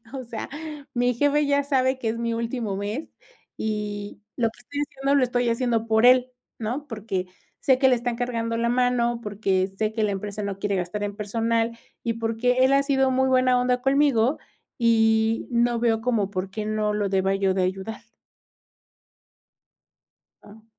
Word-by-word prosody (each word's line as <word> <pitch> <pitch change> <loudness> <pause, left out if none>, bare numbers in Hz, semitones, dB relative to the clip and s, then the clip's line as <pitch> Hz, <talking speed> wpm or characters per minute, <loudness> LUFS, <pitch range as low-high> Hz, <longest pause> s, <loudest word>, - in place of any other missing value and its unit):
o 260 -2 -5
sea, 230 -1 -6 0.5
mi 245 0 +2
jefe 290 +4 +2
ya 285 0 +2
sabe 260 -2 +1
que 230 - -2
es 230 +1 -2
mi 230 -1 -1
último 230 -3 -3
mes, 210 +9 -4 0.5
y 210 -2 -4 0.2
lo 230 -2 +2
que 230 - -21
estoy 285 +4 -6
haciendo 275 -1 -1
lo 270 - +3
estoy 245 0 0
haciendo 230 -1 0
por 220 +2 +4
él, 255 0 +5 0.3
¿no?, 245 +7 -3
porque 210 -5 -3 0.3
sé 260 -2 +3
que 265 - +5
le 255 - +5
están 240 -1 -2
cargando 230 -2 -2
la 235 0 +1
mano, 240 -1 +1
porque 195 -2 0
sé 215 0 0
que 220 - -1
la 210 - +2
empresa 205 +1 -4
no 200 -1 -4
quiere 200 0 -1
gastar 185 +3 -3
en 205 0 -4
personal, 230 +2 -1 0.2
y 230 - -1
porque 230 +2 0
él 265 - +4
ha 275 - +4
sido 270 -2 +2
muy 265 +1 +2
buena 255 -1 +4
onda 250 0 +1
conmigo, 270 -2 +3 0.4
y 225 -1 +3
no 240 0 +2
veo 225 -2 +2
como 220 -5 0
por 185 0 -3
qué 210 +2 -4
no 215 -1 0
lo 205 -1 0
deba 195 0 +1
yo 195 -1 +1
de 190 - +1
ayudar". 190 +5 -3 2.4
Ah. 215 +2 -16
230 Hz, 180 wpm, -24 LUFS, 210-250 Hz, 2.4 s, él